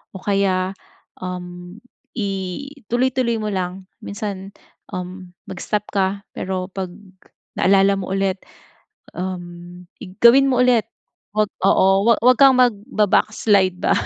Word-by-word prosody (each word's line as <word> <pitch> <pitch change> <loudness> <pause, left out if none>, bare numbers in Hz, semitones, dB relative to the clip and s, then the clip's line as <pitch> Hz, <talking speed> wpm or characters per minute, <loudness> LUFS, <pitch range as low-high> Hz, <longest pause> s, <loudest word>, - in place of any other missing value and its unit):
o 185 - -8
kaya, 190 -2 +1 0.5
um, 180 +1 -7 0.4
ituloy-tuloy 240 +5 -2
mo 215 -1 -3
lang. 185 0 -3 0.2
Minsan, 200 -1 -6 0.4
um, 180 0 -8 0.2
mag-stop 205 +3 -2
ka 200 0 -1
pero 185 0 -4
pag 190 0 -4 0.7
naalala 195 +1 +4
mo 185 - -5
ulit, 195 -1 0 0.8
um, 175 -1 -7 0.2
i 195 - -8
gawin 270 +4 +7
mo 250 -1 +2
ulit. 245 -4 +3 0.5
Huwag 215 -1 +1 0.2
oo, 190 - +4 0.2
huwa 235 - +7
huwag 255 0 +6
kang 270 -2 +7
magbaba-backslide 210 -4 +2
ba - - +2
195 Hz, 115 wpm, -20 LUFS, 185-220 Hz, 0.8 s, gawin